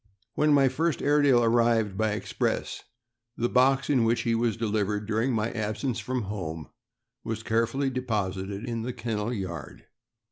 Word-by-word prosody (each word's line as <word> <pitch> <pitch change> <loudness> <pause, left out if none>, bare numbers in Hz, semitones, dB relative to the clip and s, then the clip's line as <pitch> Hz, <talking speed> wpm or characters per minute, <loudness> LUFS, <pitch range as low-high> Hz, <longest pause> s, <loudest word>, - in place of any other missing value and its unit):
When 150 0 +2
my 140 -2 +5
first 155 +5 0
Airedale 145 -4 +4
arrived 115 -3 +2
by 110 +1 +1
express, 105 - -2 0.6
the 120 - +1
box 135 +2 +3
in 130 -5 +3
which 115 +1 +2
he 115 - 0
was 115 -1 0
delivered, 105 -2 -1
during 110 +4 0
my 110 -1 0
absence 110 +2 -2
from 125 +2 -2
home, 85 -6 -5 0.5
was 110 0 -4
carefully 115 +5 0
deposited 100 -4 -3
in 115 -1 -2
the 125 +2 -4
kennel 115 -2 -3
yard. 95 - -6
115 Hz, 150 wpm, -27 LUFS, 105-125 Hz, 0.6 s, my